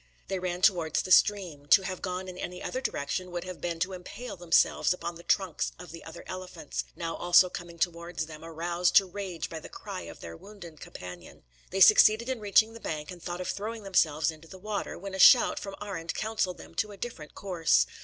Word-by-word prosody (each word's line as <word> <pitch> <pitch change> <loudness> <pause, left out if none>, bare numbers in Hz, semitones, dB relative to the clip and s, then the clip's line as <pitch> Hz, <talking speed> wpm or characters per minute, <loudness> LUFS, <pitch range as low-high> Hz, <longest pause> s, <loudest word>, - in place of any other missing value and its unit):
They 190 - -1
ran 180 0 -3
towards 170 -6 +3
the 185 - -6
stream. 180 -9 +3
To 195 - +6
have 185 -1 -5
gone 185 0 -4
in 185 - -7
any 180 0 -6
other 255 - -3
direction 180 - -3
would 175 -1 -4
have 185 -1 -8
been 170 -1 -2
to 185 +2 0
impale 185 +7 -8
themselves 175 0 +3
upon 175 -1 -5
the 170 - -12
trunks 185 -1 0
of 180 0 -10
the 165 - -10
other 165 +1 -10
elephants, 180 -4 -6
now 165 -1 -4
also 175 +1 +5
coming 170 -1 -8
towards 170 -1 -2
them, 155 0 -11
aroused 170 +2 -1
to 195 - +8
rage 185 -3 -5
by 165 - -7
the - - -11
cry - - -7
of 85 - -11
their 85 -1 -8
wounded 175 - -12
companion. 90 -2 -10 0.3
They 190 +1 -2
succeeded 215 +4 +7
in 260 -2 -2
reaching 215 +2 +3
the 230 - -10
bank, 155 -4 -5
and 175 -1 -10
thought 175 +1 -5
of 180 - -4
throwing 220 +2 -4
themselves 160 -5 +2
into 160 +1 -14
the 190 - -11
water; 205 +2 -4
when 195 +1 -7
a 190 - -5
shout 245 +5 +7
from 195 -1 -7
Arend 185 -5 -5
counselled 215 -4 -1
them - - -13
to 210 - -7
a 200 - -11
different 180 -9 -7
course. 165 - +2
180 Hz, 215 wpm, -29 LUFS, 165-195 Hz, 0.3 s, to